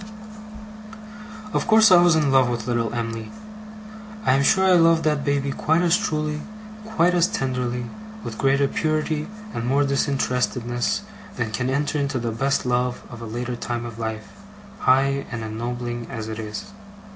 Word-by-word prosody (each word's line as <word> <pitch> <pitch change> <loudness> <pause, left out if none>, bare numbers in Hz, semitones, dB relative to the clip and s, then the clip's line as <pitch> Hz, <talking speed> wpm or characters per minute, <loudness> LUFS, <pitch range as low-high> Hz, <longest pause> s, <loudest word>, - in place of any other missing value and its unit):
Of - - 0
course 220 -2 +6
I 175 -1 +8
was 175 -2 +5
in 150 -3 +2
love 130 -2 +4
with 120 -2 -3
little 115 -2 0
Em'ly. 115 -2 -4 0.9
I - - +4
am 135 - +3
sure 190 +7 +4
I 190 - +5
loved 165 -2 +5
that 150 -2 +1
baby 140 -1 0
quite 160 +5 +1
as 175 0 +4
truly, 155 -6 -1 0.4
quite 180 -5 +2
as 175 0 +4
tenderly, 125 - -2 0.4
with 110 - -7
greater 140 +1 +3
purity 155 0 -1 0.3
and 115 - -3
more 140 +3 +3
disinterestedness, 125 - 0 0.3
than 115 -3 -2
can 125 +4 -1
enter 145 +3 0
into 140 -1 -1
the 115 -2 -2
best 135 +5 0
love 125 0 0
of 120 -1 -9
a 115 - -6
later 120 +2 -4
time 120 0 -4
of 115 -1 -8
life, 110 -1 -4 0.5
high 135 +1 +2
and 115 -2 -4
ennobling 120 +2 -4
as 110 -1 -5
it 110 0 -5
is. 110 - -6
130 Hz, 165 wpm, -23 LUFS, 120-150 Hz, 0.9 s, I